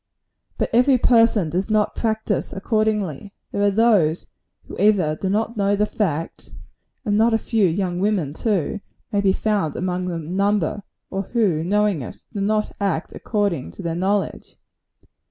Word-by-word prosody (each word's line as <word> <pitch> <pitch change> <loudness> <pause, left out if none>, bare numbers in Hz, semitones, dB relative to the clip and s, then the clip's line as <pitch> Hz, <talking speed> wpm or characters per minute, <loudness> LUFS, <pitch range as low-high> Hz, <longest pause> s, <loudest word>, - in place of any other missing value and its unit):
But - - -1
every 255 +3 +5
person 230 -8 +3
does 185 +5 -1
not 215 -1 +2
practise 220 -2 -1
accordingly. 205 - -1 0.2
There 200 - -2
are 205 - +4
those 200 -7 +2 0.3
who - - -10
either 190 -7 +3
do 190 +4 -3
not 220 +3 0
know 200 0 +2
the 210 +1 +2
fact 165 -7 -3 0.5
and 205 -1 +2
not 225 +1 +4
a - - +4
few 225 -3 +1
young 180 +1 -1
women, 190 -8 0
too; 200 0 -1 0.3
may 205 -2 +1
be 195 -1 +3
found 200 -6 0
among 180 0 -2
the 175 -2 -2
number 195 +4 0 0.3
or 195 - -1
who, 195 -7 0
knowing 205 -2 +1
it, 120 - -9
do 205 - -3
not 215 +1 0
act 190 -5 -1
according 200 - -2
to 195 - -9
their 165 -1 -2
knowledge. 190 +3 -2
200 Hz, 160 wpm, -22 LUFS, 180-215 Hz, 0.5 s, every